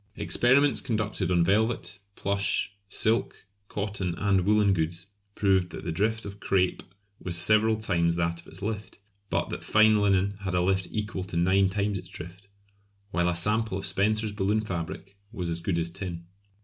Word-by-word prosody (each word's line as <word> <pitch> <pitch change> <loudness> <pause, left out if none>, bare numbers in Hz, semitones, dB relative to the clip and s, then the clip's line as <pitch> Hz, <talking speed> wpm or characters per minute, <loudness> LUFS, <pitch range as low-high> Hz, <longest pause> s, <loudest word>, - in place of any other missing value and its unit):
Experiments 135 +3 +3
conducted 110 -7 -1
on 90 -2 +3
velvet, 110 +1 0 0.2
plush, 100 0 -1 0.2
silk, 110 0 0 0.2
cotton 100 -4 -3
and 95 -1 +1
woollen 105 -1 +4
goods 85 +1 -2 0.3
proved 95 -3 +2
that - - -8
the 85 - -2
drift 110 +7 0
of 100 0 -8
crape 95 -3 +1 0.4
was 85 -1 -4
several 110 +5 +3
times 85 -6 +1
that 85 0 -1
of - - -22
its - - -11
lift, 105 0 -4 0.3
but - - -1
that - - -5
fine 110 -1 +5
linen 100 0 +2
had 95 -2 -3
a 90 - +3
lift 95 0 +1
equal 105 -3 -3
to 90 -2 -5
nine 95 +3 +3
times 100 0 -1
its 90 - -11
drift; 90 +4 -9 0.6
while 90 -1 +1
a 90 - -1
sample 105 +3 0
of 95 - -4
Spencer's 110 +2 +1
balloon 105 +1 0
fabric 95 0 -6
was 90 -7 -4
as 85 0 -3
good 85 0 -1
as 85 0 -1
tin. 85 -2 -6
100 Hz, 175 wpm, -27 LUFS, 90-105 Hz, 0.6 s, fine